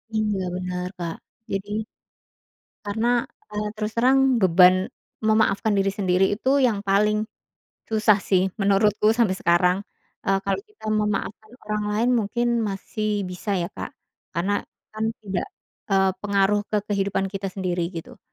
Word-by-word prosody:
Iya, 210 -2 0 0.2
bener, 180 0 -3
Kak. 170 -2 -4 0.4
Jadi 195 +1 -3 1.2
karena, 220 +3 -1 0.4
eee, 210 0 -2
terus 215 0 -3
terang 265 +1 +4
beban 180 0 +7 0.5
memaafkan 220 -1 +3
diri 195 0 +2
sendiri 190 -1 +2
itu 260 - -1 0.2
yang 215 -4 -1
paling 210 +2 +2 0.6
susah 215 -2 +4
sih 185 -2 +4 0.2
menurutku 205 +2 +3
sampai 225 -5 +2
sekarang. 180 +2 +3 0.5
Eee, 195 0 +3
kalau 195 - 0
kita 425 - -20
memaafkan 215 0 -1
orang 210 0 -2
lain 225 +4 +1
mungkin 235 +3 -1 0.2
masih 205 +1 -2
bisa 180 +3 -5
ya 170 - -1
Kak, - - -5 0.4
karena 175 +5 0 0.4
kan 215 0 -3 0.2
tidak, 190 -4 -2 0.4
eee, 190 -1 +4
pengaruh 200 0 +2
ke 215 - +1
kehidupan 195 -1 0
kita 195 0 -3
sendiri, 180 -2 -1
gitu. 165 - -8
200 Hz, 135 wpm, -24 LUFS, 190-215 Hz, 1.2 s, beban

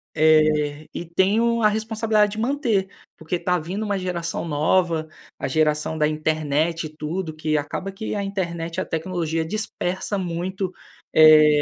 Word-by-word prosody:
eh, 155 -1 +3
e 175 - -5
tenho 215 +7 +2
a 215 - +6
responsabilidade 220 -1 +1
de 215 - -5
manter, 230 -7 0 0.3
porque 160 +2 -3
tá 180 0 0
vindo 185 +7 -4
uma 200 -2 -1
geração 170 -2 -3
nova, 160 +1 +1 0.3
a - - -2
geração 150 +2 +1
da 150 -1 +3
internet 155 +1 0
e - - -12
tudo, 160 +1 -4
que 155 0 -1
acaba 180 +7 -4
que 215 +2 -5
a 200 - -1
internet 170 -4 -3
e - - +1
a - - -3
tecnologia 165 -1 -2
dispersa 200 0 -3
muito, 185 +1 -3 0.4
eh, 155 -1 +7
170 Hz, 155 wpm, -23 LUFS, 155-195 Hz, 0.4 s, eh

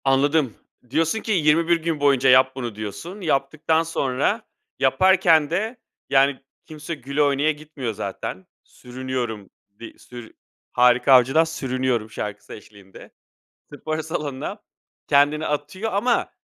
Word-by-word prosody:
Anladım. 135 -1 +2 0.4
Diyorsun 165 - 0
ki, 225 - -4
"21 165 -1 +3
gün 165 -2 -1
boyunca 135 -2 +3
yap 130 +1 +5
bunu." 120 -5 -5
diyorsun. 135 - -7
Yaptıktan 155 +1 0
sonra, 150 - -1 0.4
yaparken 165 +1 +4
de, 215 +8 -2 0.3
yani, 135 0 +3 0.3
kimse 155 +1 -7
güle 140 +1 -1
oynaya 145 +2 +2
gitmiyor 145 -6 -6
zaten. 100 -2 -6 0.2
Sürünüyorum. 125 -5 -6 0.3
Di 115 - -11
sürü 120 -2 -12 0.4
Harika 125 +2 +4
Avcı'dan 130 +5 +5
"Sürünüyorum" 130 -7 -2
şarkısı 105 -1 -7
eşliğinde 100 -2 -14 0.6
spor 155 +2 -4
salonuna 155 +5 -5 0.4
kendini 145 +2 +3
atıyor 150 +9 -3
ama 235 +5 +1
140 Hz, 115 wpm, -22 LUFS, 125-160 Hz, 0.6 s, yap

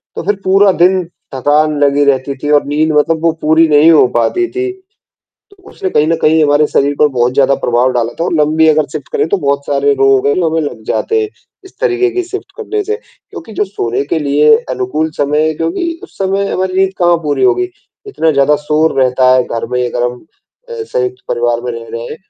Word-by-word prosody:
तो - - -4
फ़िर 205 +2 0
पूरा 195 +1 +4
दिन 185 +1 +2 0.3
थकान 150 +3 +1
लगी 145 0 +2
रहती 135 0 0
थी 145 - -2
और 145 - +4
नींद 150 +2 0
मतलब 155 +2 +1
वो 165 - +3
पूरी 160 +2 +3
नहीं 150 +1 +5
हो 155 -5 +5
पाती 235 - +1
थी। 380 0 -2 0.8
तो 400 - -21
उसने 390 -2 -4
कहीं 150 - +2
न 165 - +1
कहीं 160 +1 +3
हमारे 145 0 +3
शरीर 145 0 0
पर 150 - +4
बहुत 125 -2 0
ज़्यादा 140 0 +3
प्रभाव 120 +2 +1
डाला 120 -1 -1
था - - +1
और - - -2
लम्बी 155 +1 +2
अगर 155 -1 +2
शिफ्ट 150 - -6
करें - - 0
तो 200 - +1
बहुत 140 -5 -1
सारे 140 0 +1
रोग 135 0 +2
है 145 - +2
जो 175 -3 +1
हमें 160 0 0
लग 145 -7 -5
जाते 445 - -1
हैं। 425 - -3 0.4
इस 380 - -16
तरीक़े 375 -6 +1
की 370 0 -2
शिफ्ट 395 +2 -8
करने 430 -1 -3
से 430 +2 -2
क्योंकि 330 - -14
जो 210 - -1
सोने 135 - -3
के 165 - +2
लिए 150 0 +3
अनुकूल 130 +5 -2
समय 150 +2 +1
है 155 - -1
क्योंकि 330 - -3
उस - - -14
समय 195 +1 -1
हमारी 185 0 -2
नींद 190 0 +2
कहाँ 175 -1 +3
पूरी 150 - 0
होगी। 370 -1 +2 0.4
इतना 165 - 0
ज़्यादा 140 +1 +3
शोर 155 -1 +1
रहता 130 0 +3
है 130 - +3
घर 115 -1 -4
में 125 0 0
अगर 120 0 -3
हम 125 +4 -5 0.4
अ, - - -8
संयुक्त 405 -4 -3
परिवार 120 0 0
में 125 +1 -4
रह 115 0 -8
रहे 115 - -5
हैं, 120 - -7
155 Hz, 225 wpm, -13 LUFS, 140-190 Hz, 0.8 s, नहीं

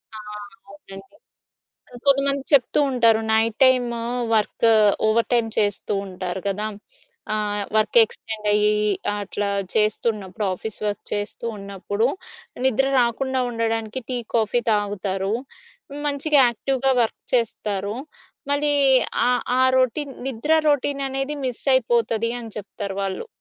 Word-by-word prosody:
ఆ! - - -7 0.5
అవునండి. 195 +3 -13 0.9
కొంతమంది 275 0 +3
చెప్తూ 265 -2 +4
ఉంటారు. 230 -3 +4
Night 220 0 +2
time 245 -2 +3 0.4
work 220 +1 +2 0.4
over 225 +2 +2
time 235 -2 +2
చేస్తూ 205 -1 0
ఉంటారు 185 0 -5
కదా! 210 +2 -2 0.7
ఆహ్, 210 -1 -1
వర్క్ 215 +2 +4
ఎక్స్‌టెండయ్యి 210 -1 0 0.5
అట్లా 205 0 -3 0.3
చేస్తూ 215 +1 +1
ఉన్నప్పుడు 195 0 -6
ఆఫీస్ 220 +3 -6
వర్క్ 205 0 -3
చేస్తూ 205 +2 -4
ఉన్నప్పుడు 200 +2 -2 0.6
నిద్ర 265 +1 +2
రాకుండా 260 +2 0
ఉండడానికి 225 +1 -2
టీ, 255 - -2 0.2
కాఫీ 230 +1 +2
తాగుతారు. 200 -2 -1 0.7
మంచిగా 290 +1 +2
యాక్టివ్‌గా 265 +3 0
వర్క్ 225 - -3
చేస్తారు. 210 -4 -1 0.6
మళ్ళీ 290 0 +2 0.5
ఆహ్, 250 0 +1 0.2
ఆ - - +5 0.2
రొటీన్ 265 +2 0
నిద్ర 265 +5 -1 0.2
రొటీననేది 275 0 -1
మిసైపోతది 235 -3 +1
అని 225 -2 -9
చెప్తారు 200 -1 -6
వాళ్ళు. 195 -1 -4
225 Hz, 110 wpm, -22 LUFS, 205-260 Hz, 0.9 s, ఆ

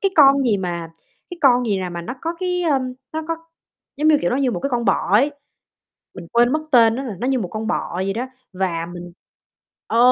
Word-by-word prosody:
cái 390 - +2
con 275 -2 +7
gì 220 -5 +3
mà, 170 -3 -4 0.4
cái 355 - -8
con 250 -4 +4
gì 205 -3 +1
nè 185 -1 -3
mà 175 -1 -6
nó 245 +9 -5
có 330 +1 -3
cái, 360 -1 -1
ơm, 270 -6 0 0.2
nó 315 0 -3
có 330 - +1 0.6
giống 305 +2 +2
như 305 -1 +6
kiểu 175 - 0
nó - - +1
như 270 -2 +1
một - - -3
cái 275 - -2
con 240 -2 0
bọ - - +1
ấy, 270 +8 +5 0.8
mình 175 - -10
quên 240 +2 +4
mất 310 - +1
tên 230 -3 +6
nó 265 - -3
rồi, 235 -7 -5
nó 245 - -1
như 265 -1 +1
một 195 - -3
con 220 +2 -4
bọ - - -2
vậy 190 +2 -1
đó. 240 +5 -3 0.3
Và 175 -3 -1
mình 175 0 -9 0.7
ờ, 230 - 0
245 Hz, 245 wpm, -21 LUFS, 190-275 Hz, 0.8 s, con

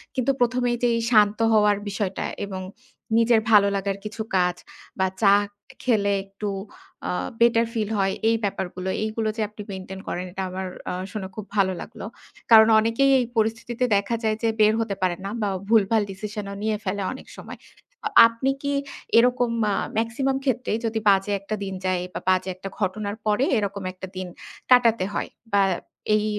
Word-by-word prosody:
কিন্তু 260 +1 +2
১ম 250 +1 +2
এই 240 - 0
যেই 235 -1 +3
শান্ত 210 -1 +4
হওয়ার 210 -1 +4
বিষয়টা 195 -1 -3 0.2
এবং 190 -1 -5 0.6
নিজের 230 -1 +4
ভালো 205 -2 +7
লাগার 195 0 -2
কিছু 215 +1 -5 0.2
কাজ 180 -1 +2 0.4
বা 190 - +3
চা 200 -2 +6 0.5
খেলে 210 -5 +2
একটু 195 +1 -5 0.6
আ - - 0 0.3
বেটার 235 0 +5
ফিল 215 -3 -1
হয় 195 0 +1 0.2
এই 230 - +3
ব্যাপারগুলো 190 -1 -3
এইগুলো 220 0 -1
যে - - -1
আপনি 210 0 -10
মেইনটেইন 190 0 -7
করেন 180 +1 -3
এটা 190 +1 -4
আমার 185 0 -4 0.2
আ - - -3 0.2
শুনে 205 -3 -5
খুব 215 - -6
ভালো 190 -2 +3
লাগলো। - - -9 0.5
কারণ 220 -1 +9
অনেকেই 230 +5 +2
এই 250 - 0
পরিস্থিতিতে 230 +2 0
দেখা 200 +4 -1
যায় 220 -1 +1
যে 225 - +3
বের 215 +1 +6
হতে 210 -3 -2
পারে 180 -1 +2
না 195 - -3
বা 205 - +1 0.2
ভুলভাল 220 0 +4
ডিসিশন 210 +1 -6
ও - - -7
নিয়ে 215 -1 0
ফেলে 200 +1 -2
অনেক 260 - -11
সময়। - - -9 0.5
অ - - -4 0.2
আপনি 230 +4 -1
কি 285 0 0 0.5
এরকম 245 0 +3 0.2
মা 205 - +1 0.3
মেক্সিমাম 265 +4 0
ক্ষেত্রে 250 -1 0
যদি 225 0 -1
বাজে 195 +1 +3
একটা 205 +2 -4
দিন 195 -1 -4
যায় 185 -1 0
বা - - -3
বাজে 185 0 +2
একটা 195 +1 -7
ঘটনার 205 +1 -2
পরে 215 +5 +2
এরকম 200 -2 -2
একটা 190 0 -8
দিন 185 - -4 0.4
কাটাতে 230 -6 +5
হয়। - - -2 0.2
বা 200 -1 +5 0.5
এই 210 0 +1
210 Hz, 175 wpm, -24 LUFS, 195-230 Hz, 0.6 s, কারণ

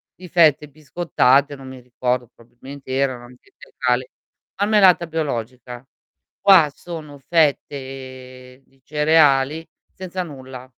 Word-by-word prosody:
di 180 - -12
fette 150 -3 +3
biscottate, 145 -2 +1
non 135 -1 -12
mi 130 0 -10
ricordo 125 0 -2
probabilmente 130 +4 -13
erano 130 -3 -1
anche 125 0 -19
integrali, 125 0 -3 0.5
marmellata 200 -4 +4
biologica. 125 -5 -5 0.6
Qua 185 -7 +6
sono 155 -4 -10
fette 130 -4 -3
di 135 -1 -32
cereali, 150 0 +2 0.3
senza 185 0 -5
nulla. 130 -5 -10
135 Hz, 105 wpm, -20 LUFS, 130-160 Hz, 0.6 s, Qua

